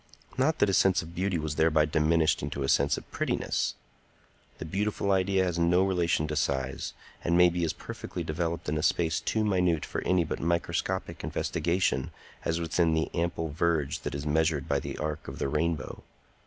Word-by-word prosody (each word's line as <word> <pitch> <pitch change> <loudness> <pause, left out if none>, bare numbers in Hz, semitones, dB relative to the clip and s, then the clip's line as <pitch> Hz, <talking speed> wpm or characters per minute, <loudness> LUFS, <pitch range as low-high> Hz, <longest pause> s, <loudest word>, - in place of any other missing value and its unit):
Not 150 +5 +2
that - - +3
his 95 - +3
sense 95 -1 +3
of 80 +1 -11
beauty 95 +1 0
was 75 -2 -3
thereby 80 -1 +4
diminished 80 +1 +2
into 70 - -3
a - - -1
sense 70 0 +3
of - - -9
prettiness. - - -1 0.8
The - - -6
beautiful 100 +3 -1
idea 95 0 +2
has 90 -2 -1
no 90 +2 +4
relation 85 -5 +1
to 75 - -2
size, 65 -3 -1 0.3
and 85 +1 +2
may 90 0 +7
be 85 0 -2
as 80 - -1
perfectly - - -6
developed 85 +1 -3
in 75 +1 0
a - - -1
space 80 0 +1
too 110 -1 0
minute 90 -5 +2
for - - -4
any 90 -1 +2
but 80 - -4
microscopic 85 +1 -1
investigation 85 -5 0 0.3
as 85 +1 0
within 85 0 +1
the 80 - -1
ample 85 -2 -1
verge 80 -1 0
that 75 -1 -5
is 70 +1 -4
measured 75 -1 +1
by - - +1
the - - -6
arc 75 0 -4
of - - -7
the - - -1
rainbow. 75 -1 -2
85 Hz, 190 wpm, -28 LUFS, 75-90 Hz, 0.8 s, may